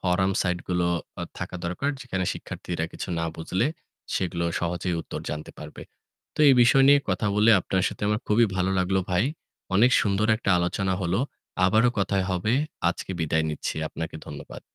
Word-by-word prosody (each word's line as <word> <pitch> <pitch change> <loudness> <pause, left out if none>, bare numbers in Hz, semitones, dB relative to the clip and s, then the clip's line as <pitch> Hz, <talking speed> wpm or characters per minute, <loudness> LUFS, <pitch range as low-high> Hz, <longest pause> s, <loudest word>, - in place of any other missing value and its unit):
From 95 +1 +1
site 90 -2 0
গুলো 90 -1 +1 0.5
থাকা 90 - -5
দরকার। 90 +12 -1
যেখানে 95 -8 -2
শিক্ষার্থীরা 85 -2 -5
কিছু - - -6
না 85 - -1
বুঝলে 90 +7 -1 0.5
সেগুলো 85 -2 -1 0.2
সহজেই 90 +1 -1
উত্তর - - -6
জানতে 75 0 -5
পারবে। - - -9 0.5
তো - - -15
এই 135 - +7
বিষয় 135 +2 +5
নিয়ে 145 0 +7
কথা 95 +3 0
বলে 105 +2 +5
আপনার 95 +1 -1
সাথে - - -9
আমার 105 +2 +1
খুবই 115 +2 +4
ভালো 95 +1 +1
লাগলো 95 +1 +1
ভাই। 90 +5 +2 0.5
অনেক 120 +6 +5
সুন্দর 100 +1 +1
একটা 110 -2 -1
আলোচনা 95 +2 0
হলো। 90 +5 0 0.4
আবারো 110 +6 +4
কথায় 100 -1 +1
হবে। 95 +5 0 0.4
আজকে 90 - -4
বিদায় 80 0 +1
নিচ্ছি। 75 - -3
আপনাকে 80 0 -6
ধন্যবাদ। 70 -1 -9
95 Hz, 165 wpm, -25 LUFS, 90-105 Hz, 0.5 s, এই